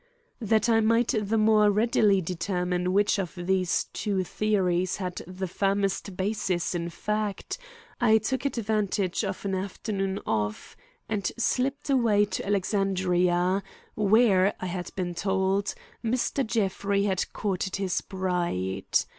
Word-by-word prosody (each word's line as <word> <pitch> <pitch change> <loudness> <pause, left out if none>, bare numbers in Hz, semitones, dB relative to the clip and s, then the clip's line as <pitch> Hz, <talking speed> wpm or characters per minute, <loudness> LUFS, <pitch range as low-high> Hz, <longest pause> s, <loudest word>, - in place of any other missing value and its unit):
That 220 0 +2
I 225 -1 +4
might 230 +2 +3
the 210 +2 0
more 215 -1 +5
readily 210 -2 +3
determine 180 +1 -1
which 205 +1 +3
of 185 -2 -4
these 185 0 +1
two 195 -3 -1
theories 185 -3 0
had 185 -3 -4
the 185 +1 -4
firmest 195 0 -1
basis 190 -3 -1
in 170 -1 -2
fact, 210 - -3 0.4
I 220 -2 +5
took 260 +4 -2
advantage 215 -6 0
of 195 -1 -4
an 195 - -1
afternoon 195 0 -2
off 105 -1 -2 0.3
and 205 -4 -1
slipped 270 +4 0
away 225 -6 +4
to 195 -2 -4
Alexandria, 185 -2 +1 0.3
where, 205 -2 +4
I - - -4
had 180 -1 -4
been 180 -2 -2
told, 190 +2 0 0.3
Mr. 245 +4 0
Jeffrey 200 -2 0
had 190 -3 -1
courted 190 -1 -2
his 195 -2 -1
bride. 175 - -2
195 Hz, 130 wpm, -27 LUFS, 185-215 Hz, 0.4 s, more